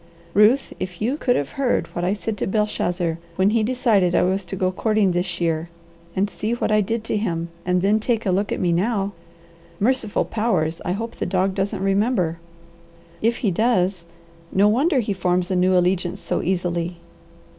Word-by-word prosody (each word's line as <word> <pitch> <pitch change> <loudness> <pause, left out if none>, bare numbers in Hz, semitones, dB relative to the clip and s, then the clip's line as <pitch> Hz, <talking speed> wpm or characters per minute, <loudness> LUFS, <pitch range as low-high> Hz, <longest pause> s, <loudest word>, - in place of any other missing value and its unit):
Ruth, 220 +7 +4
if 185 -2 -5
you 240 +6 0
could 255 -4 +1
have 140 -1 -2
heard 255 -3 +2
what 175 - -3
I 185 +2 +1
said 210 +2 -3
to - - -2
Belshazzar 180 -5 -1 0.2
when 190 +3 +3
he 230 0 +2
decided 215 -6 +2
I - - +4
was 190 +2 +1
to 175 - -5
go 185 -1 0
courting 215 0 +1
this 180 0 -2
year, 165 -1 -1 0.5
and 195 +2 +2
seen 215 +3 -3
what 240 - -1
I 215 0 +4
did 225 +3 -2
to 225 - -1
him, 170 -5 -2 0.2
and 180 0 +2
then 210 +2 +3
take 225 0 -1
a 190 - +2
look 200 +3 0
at - - -1
me 175 -2 +1
now 200 +3 0 0.7
merciful 225 -1 +1
powers, 185 -8 0
I 180 - -1
hope 225 +4 -5
the - - -2
dog 190 +1 +1
doesn't 195 0 -2
remember! 195 -4 +1 0.8
If 230 +2 +2
he 200 - +3
does, 185 -4 +1 0.4
no 200 +2 +4
wonder 265 +6 +3
he 210 -2 -2
forms 180 -1 0
a - - +1
new 185 +1 +3
allegiance 180 0 +1
so - - -2
easily. 175 -1 -1
195 Hz, 190 wpm, -22 LUFS, 180-215 Hz, 0.8 s, Ruth